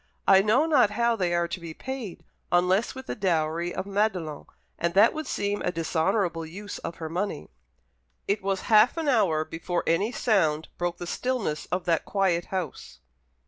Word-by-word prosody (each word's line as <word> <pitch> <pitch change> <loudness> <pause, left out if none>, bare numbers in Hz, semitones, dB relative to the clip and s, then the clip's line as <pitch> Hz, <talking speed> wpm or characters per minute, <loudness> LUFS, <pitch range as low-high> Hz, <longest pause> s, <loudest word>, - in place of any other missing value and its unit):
I 195 0 +7
know 220 +9 +3
not 285 -9 +4
how 235 +2 +1
they 180 -5 0
are 170 0 +1
to 170 - -5
be 165 -2 -8
paid, 265 -9 -6 0.3
unless 180 +7 +2
with 260 0 -8
the - - -4
dowry 170 -3 0
of - - -4
Madelon, 195 -7 -1 0.3
and 170 +1 -1
that 210 +4 +6
would 310 0 -5
seem 205 0 -2
a 180 - 0
dishonourable 165 +1 0
use 195 +6 -7
of 165 - -6
her 160 - -6
money." 175 - -4 0.8
It 200 +1 0
was 195 0 -1
half 220 +6 +4
an 325 -2 -2
hour 190 - +2
before 170 +2 -3
any 195 +8 +1
sound 160 -11 +1
broke 175 0 -1
the 175 - -6
stillness 220 -6 -2
of 180 0 -2
that 165 -2 +1
quiet 185 -4 +1
house. 185 -6 -5
185 Hz, 180 wpm, -26 LUFS, 170-215 Hz, 0.8 s, I